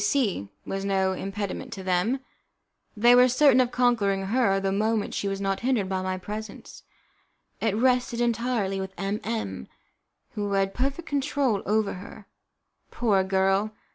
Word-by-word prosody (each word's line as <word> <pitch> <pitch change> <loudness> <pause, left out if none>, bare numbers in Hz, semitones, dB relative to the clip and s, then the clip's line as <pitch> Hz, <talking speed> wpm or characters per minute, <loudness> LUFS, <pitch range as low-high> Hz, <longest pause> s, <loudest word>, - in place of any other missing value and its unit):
C - - 0
C 245 - 0 0.2
was 195 0 -3
no 190 -1 +1
impediment 200 +6 -4
to 195 -3 -7
them. 190 +8 0 0.8
They 240 +3 +6
were 250 +1 +7
certain 255 0 +5
of 250 - +1
conquering 225 -6 +1
her 200 -2 +2
the 195 0 -1
moment 215 +1 0
she 200 - -2
was 195 0 -2
not 195 -1 -1
hindered 240 -6 0
by 190 -1 -1
my 185 0 -2
presence. 210 +4 -8 0.8
It 220 -3 0
rested 250 +1 +1
entirely 230 -5 0
with 190 0 -7
M 195 +2 -2
M, 100 - -4 0.6
who 205 -1 -3
had 195 0 +1
perfect 275 +6 -2
control 275 -6 0
over 215 0 +1
her. 205 +1 -11 0.6
Poor 205 -5 +1
girl! 195 +2 +1
205 Hz, 155 wpm, -26 LUFS, 195-245 Hz, 0.8 s, were